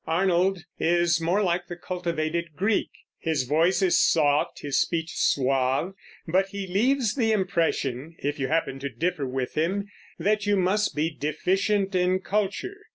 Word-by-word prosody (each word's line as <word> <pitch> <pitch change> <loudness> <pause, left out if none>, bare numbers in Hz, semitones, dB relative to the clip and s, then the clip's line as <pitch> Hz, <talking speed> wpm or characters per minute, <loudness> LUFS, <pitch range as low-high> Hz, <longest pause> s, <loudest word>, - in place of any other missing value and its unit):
Arnold 180 +1 +1 0.2
is 170 0 +2
more 180 +6 +1
like 175 -1 0
the 175 - -6
cultivated 170 -2 -3
Greek; 200 +6 +1 0.3
his 160 -5 0
voice 165 +9 +2
is 185 - +4
soft, 145 -3 +2
his 145 -2 +1
speech 165 -1 -1
suave, 135 +5 +1 0.3
but 190 +4 +2
he 200 0 -5
leaves 225 +5 +1
the 225 -5 +1
impression, 165 - -1
if 145 +1 -3
you 135 - 0
happen 155 -4 -1
to 140 +1 -4
differ 150 +3 -2
with 130 0 -3
him, 190 +6 0 0.3
that 210 0 0
you 205 -1 +3
must 195 +3 +1
be 155 +2 0
deficient 190 +6 0
in 185 0 +2
culture. 210 - -2
175 Hz, 155 wpm, -26 LUFS, 155-195 Hz, 0.3 s, is